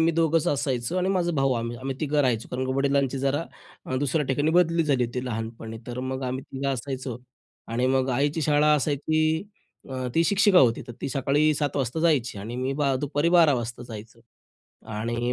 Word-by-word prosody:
मी 165 +1 +4
दोघंच 165 0 +2
असायचो 135 +2 -1
आणि 185 - 0
माझा 180 -3 +1
भाऊ 135 -3 +2
आम्ही. 115 0 -3
आम्ही 130 +1 -4
तिघं 150 -1 0
राहायचो. 120 -4 0
कारण 130 +1 -2
की 130 - -1
वडिलांची 140 -1 +1
जरा 140 +4 0 0.4
अ, 130 - -2
दुसऱ्या 145 +2 0
ठिकाणी 145 +4 +1
बदली 170 -1 +3
झाली 135 -4 +2
होती 125 +2 -4
लहानपणी. 115 -1 -5
तर 125 +1 -5
मग 130 0 -4
आम्ही 130 +1 -3
तिघं 135 +1 -2
असायचो 130 -1 -4 0.5
आणि 120 +2 0
मग 130 0 +2
आईची 145 +5 0
शाळा 150 +1 +4
असायची. 150 +2 0 0.7
अ, 130 -1 -4
ती 165 +1 +4
शिक्षिका 200 0 +4
होती. 120 -6 +4
तर - - -6
ती - - -2
सकाळी 140 +3 +2
7:00 145 -1 -2
वाजता 135 +2 -1
जायची 140 -10 +1
आणि 115 +5 -6
मी 130 +2 -1
बा 140 -2 +2
दुपारी 145 +3 +1
12:00 155 -4 +6
वाजता 120 0 -4
जायचो. 110 +2 -10 0.7
आणि 120 +3 -2
135 Hz, 190 wpm, -25 LUFS, 125-150 Hz, 0.7 s, 12:00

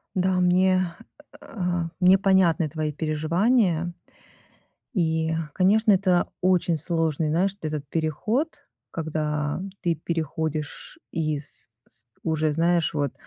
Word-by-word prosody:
Да, 185 0 +2
мне, 185 +1 +4 0.6
э, - - -13
а, 175 -4 -2
мне 185 +1 +6
понятны 185 -5 +3
твои 155 0 -3
переживания. 170 - +1 1.0
И, 160 -5 +1 0.2
конечно, 210 +4 +4
это 185 -2 +2
очень 180 -2 +2
сложный, 160 -1 0
знаешь, 185 +5 +2
вот 155 - -3
этот 145 -2 -4
переход, 165 - 0 0.4
когда 150 -1 -2 0.2
ты 170 -1 +1
переходишь 160 -1 -4
из 155 -3 -3 0.2
с 120 -1 -11 0.2
уже 155 -1 +1
знаешь 170 +1 +2
вот, 145 -3 0
165 Hz, 115 wpm, -25 LUFS, 155-185 Hz, 1.0 s, мне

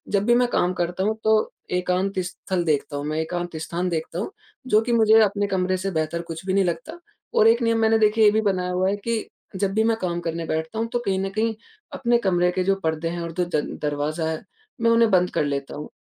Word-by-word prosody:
जब 200 0 +1
भी 240 +1 +4
मैं 245 0 +3
काम 180 +1 +1
करता 180 +1 -2
हूँ, 215 +2 +1
तो 220 0 +3 0.2
एकांत 180 +2 0
स्थल 180 0 -3
देखता 145 -2 0
हूँ, 145 - -4
मैं 155 +1 -2
एकांत 175 +1 -3
स्थान 175 +3 -2
देखता 165 +1 -3
हूँ, 295 - -3 0.4
जो 215 -2 +4
कि 240 - -2
मुझे 220 -1 +6
अपने 205 0 0
कमरे 185 -1 0
से 195 +1 -3
बेहतर 160 0 -1
कुछ 165 +2 -7
भी 190 - -1
नहीं 195 0 +3
लगता। 295 - -4 0.3
और 215 - +5
एक 230 +2 +4
नियम 230 -1 +2
मैंने, 220 0 +4
देखिए, 215 +1 +4
ये 210 - +7
भी 220 - +2
बनाया 185 -3 0
हुआ 185 +1 +1
है 200 - 0
कि 225 +2 -3 0.3
जब 195 +1 -1
भी 220 +2 +2
मैं 225 0 +2
काम 175 -4 -2
करने 165 0 -3
बैठता 160 +7 -3
हूँ, 225 - 0
तो 240 - +1
कहीं 190 -1 +1
न - - -2
कहीं 225 +1 0 0.4
अपने 240 -2 +2
कमरे 180 -5 +2
के 185 0 -1
जो 195 +1 +2
पर्दे 160 +1 -1
हैं 170 +1 -4
और 170 0 -4
दो 180 - 0
जन 150 - -3
दरवाज़ा 150 +2 -1
है, 160 - -5 0.4
मैं 230 0 +4
उन्हें 230 -1 +4
बंद 180 -1 +4
कर - - +1
लेता 140 -1 -3
हूँ, 150 - -7
185 Hz, 245 wpm, -23 LUFS, 170-220 Hz, 0.4 s, ये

